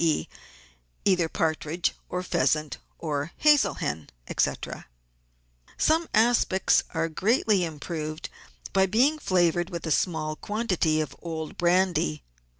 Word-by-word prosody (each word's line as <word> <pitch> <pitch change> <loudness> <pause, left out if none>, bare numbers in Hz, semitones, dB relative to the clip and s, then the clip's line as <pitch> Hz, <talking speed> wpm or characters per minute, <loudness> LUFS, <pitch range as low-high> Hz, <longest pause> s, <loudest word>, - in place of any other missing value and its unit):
e., 155 - +1 0.8
either 180 -4 +3
partridge 160 +1 -1 0.2
or 180 0 -3
pheasant, 155 -4 0 0.2
or 150 -1 -3
hazel 295 -10 +4
hen, 75 0 -4 0.3
&c. - - +3 1.3
Some 320 +1 +2
aspics 220 -4 +3
are 165 0 +1
greatly 205 - +2
improved 155 0 -5 0.5
by 190 0 +4
being 260 +10 +3
flavoured 175 - +1
with 170 -1 -5
a 160 - -2
small 155 -2 0
quantity 185 -7 0
of 140 -2 -5
old 160 -2 -5
brandy. 175 - +1
170 Hz, 115 wpm, -26 LUFS, 155-195 Hz, 1.3 s, hazel